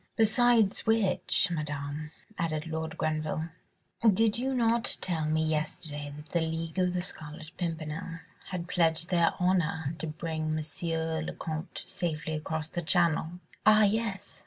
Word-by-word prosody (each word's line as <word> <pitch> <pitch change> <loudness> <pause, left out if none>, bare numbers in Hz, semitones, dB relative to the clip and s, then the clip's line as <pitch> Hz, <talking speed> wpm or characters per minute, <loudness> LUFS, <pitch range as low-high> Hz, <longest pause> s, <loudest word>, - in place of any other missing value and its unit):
"Besides 225 -2 +4
which, 210 -3 +3
Madame," 150 -1 -3 0.3
added 155 -2 -1
Lord 160 -1 -4
Grenville, 155 +1 -1 0.5
"did 220 0 +4
you 265 +2 0
not 235 -1 +2
tell 165 -4 -1
me 155 +1 +2
yesterday 150 -1 -2
that 150 +1 -11
the 170 - +1
League 160 +2 -2
of 180 -1 +2
the 180 - 0
Scarlet 155 -2 -7
Pimpernel 165 -1 -4 0.3
had 180 -2 -4
pledged 165 -1 +1
their 170 -2 +4
honour 165 -4 +1
to 160 - -3
bring 155 0 -2
M. 160 +1 -2
le - - -4
Comte 160 +2 -5
safely 160 -2 -3
across 155 0 -2
the 175 +1 -3
Channel?" 170 -1 +2 0.3
"Ah, 215 0 +7
yes!" 205 -1 0
165 Hz, 140 wpm, -30 LUFS, 155-185 Hz, 0.5 s, Ah